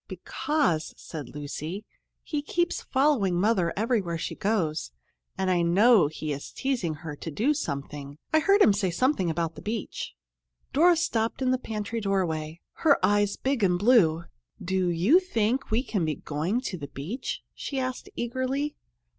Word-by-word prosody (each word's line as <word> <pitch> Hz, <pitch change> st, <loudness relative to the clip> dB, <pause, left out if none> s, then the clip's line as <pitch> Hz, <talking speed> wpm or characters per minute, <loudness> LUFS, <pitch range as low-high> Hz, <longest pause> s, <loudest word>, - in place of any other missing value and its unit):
"Because," 280 Hz, -, -1 dB
said 150 Hz, -7 st, -8 dB
Lucy, 155 Hz, +7 st, -6 dB, 0.4 s
"he 300 Hz, -2 st, -2 dB
keeps 345 Hz, +3 st, -1 dB
following 260 Hz, -9 st, +2 dB
Mother 190 Hz, -4 st, +2 dB
everywhere 210 Hz, -6 st, 0 dB
she -, -, -4 dB
goes, 165 Hz, -, -1 dB, 0.5 s
and 190 Hz, -1 st, +1 dB
I 175 Hz, -1 st, +3 dB
know 190 Hz, +2 st, +5 dB
he 155 Hz, 0 st, -4 dB
is 140 Hz, -, -7 dB
teasing 235 Hz, -, -1 dB
her 155 Hz, -2 st, -4 dB
to 165 Hz, -, -6 dB
do 230 Hz, -, +1 dB
something. 145 Hz, -, -5 dB, 0.2 s
I 315 Hz, -, +6 dB
heard 400 Hz, +5 st, +5 dB
him 210 Hz, -, +6 dB
say 195 Hz, -2 st, 0 dB
something 190 Hz, -, +1 dB
about 165 Hz, 0 st, -1 dB
the -, -, -11 dB
beach." 220 Hz, -1 st, -4 dB, 0.6 s
Dora 345 Hz, +5 st, +6 dB
stopped 230 Hz, -9 st, 0 dB
in 260 Hz, -1 st, +1 dB
the 255 Hz, -, +1 dB
pantry 220 Hz, -1 st, -4 dB
doorway, 170 Hz, -5 st, -1 dB, 0.2 s
her 300 Hz, -4 st, +5 dB
eyes 205 Hz, 0 st, +2 dB
big 265 Hz, -2 st, -1 dB
and 180 Hz, -3 st, +3 dB
blue. 180 Hz, -7 st, +4 dB, 0.4 s
"Do 185 Hz, 0 st, 0 dB
you 185 Hz, -, +5 dB
think 250 Hz, -, 0 dB
we 225 Hz, +4 st, +1 dB
can 200 Hz, -9 st, -1 dB
be 155 Hz, -2 st, 0 dB
going 165 Hz, +11 st, -2 dB
to 190 Hz, -9 st, -4 dB
the 145 Hz, -, -6 dB
beach?" 175 Hz, -, -5 dB
she 275 Hz, -, -5 dB
asked 255 Hz, -1 st, -4 dB
eagerly. 260 Hz, +4 st, -2 dB
205 Hz, 165 wpm, -27 LUFS, 165-255 Hz, 0.6 s, I